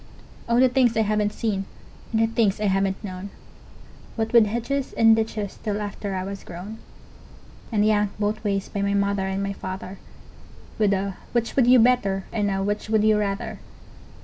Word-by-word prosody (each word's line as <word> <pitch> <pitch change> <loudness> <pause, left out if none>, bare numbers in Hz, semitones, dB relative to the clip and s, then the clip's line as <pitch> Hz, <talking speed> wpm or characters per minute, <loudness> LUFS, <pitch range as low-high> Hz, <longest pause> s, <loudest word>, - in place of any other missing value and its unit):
Oh, 235 +1 +3
the 260 - +6
things 245 -3 +2
I - - +4
haven't 210 0 +1
seen 205 -3 -2 0.5
and 220 - +1
the 225 - +4
things 225 -3 +1
I 210 - -1
haven't 195 0 0
known, 190 0 -6 0.9
What 225 0 -2
with 230 -3 +7
hedges 240 +5 -2
and 225 -1 +6
ditches 220 -2 -3
till 210 -2 -2
after 205 -1 -4
I 185 - -2
was 195 +1 -6
grown, 195 +6 -8 0.9
And 210 -2 +2
yanked 210 -1 +1
both 210 +1 -1
ways 200 -2 -1
by 200 - -4
my 200 0 +1
mother 200 -1 0
and 190 +1 -2
my 200 0 -2
father, 190 0 -7 0.8
With 210 -2 +3
a 195 -1 -2 0.2
'Which 235 -1 0
would 255 -3 +4
you 255 +1 +7
better?" 225 -5 +3
and 210 -2 0
a 195 0 -1
"Which 205 +2 -2
would 220 -1 +3
you 215 -1 +4
rather?" 210 +1 -3
210 Hz, 185 wpm, -24 LUFS, 195-225 Hz, 0.9 s, with